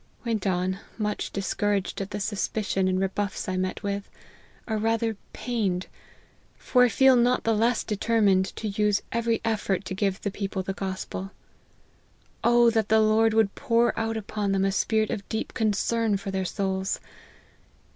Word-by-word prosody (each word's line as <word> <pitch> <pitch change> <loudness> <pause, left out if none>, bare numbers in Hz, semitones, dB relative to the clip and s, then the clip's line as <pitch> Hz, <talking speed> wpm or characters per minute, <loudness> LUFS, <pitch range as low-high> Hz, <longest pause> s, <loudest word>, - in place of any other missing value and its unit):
Went 220 -4 -1
on, 185 +1 0 0.2
much 210 -2 -2
dis 195 -1 -2
couraged 205 -2 -1
at 195 - -4
the 205 - -4
suspicion 200 -1 -1
and 185 0 +1
rebuffs 195 +1 -2
I 185 - -1
met 185 +3 -2
with, 200 0 -3 0.6
or 220 -2 -1
rather 225 +1 0 0.2
pained 205 -7 -1 0.4
/ - - -34
for 250 -1 +3
I - - +2
feel 265 +2 +5
not 245 +1 +3
the 225 - +2
less 230 +3 +2
determined 205 -3 +2
to 220 - -4
use 205 0 +1
every 230 -1 0
effort 205 -4 0
to 190 - -4
give 195 0 0
the 200 - -2
people 195 -1 -3
the 195 - -3
gospel. 190 0 -5 1.1
Oh! 235 0 +5
that 220 -2 0
the 220 +1 +5
Lord 220 +1 +3
would 220 -3 +3
pour 235 0 +2
out 225 0 -1
upon 205 -1 -2
them 195 0 +2
a 195 - +2
spirit 215 +2 +1
of 200 - -5
deep 220 - -3
concern 220 -1 +1
for 195 0 -5
their 190 -1 -1
souls 190 0 -1
210 Hz, 170 wpm, -26 LUFS, 195-225 Hz, 1.1 s, feel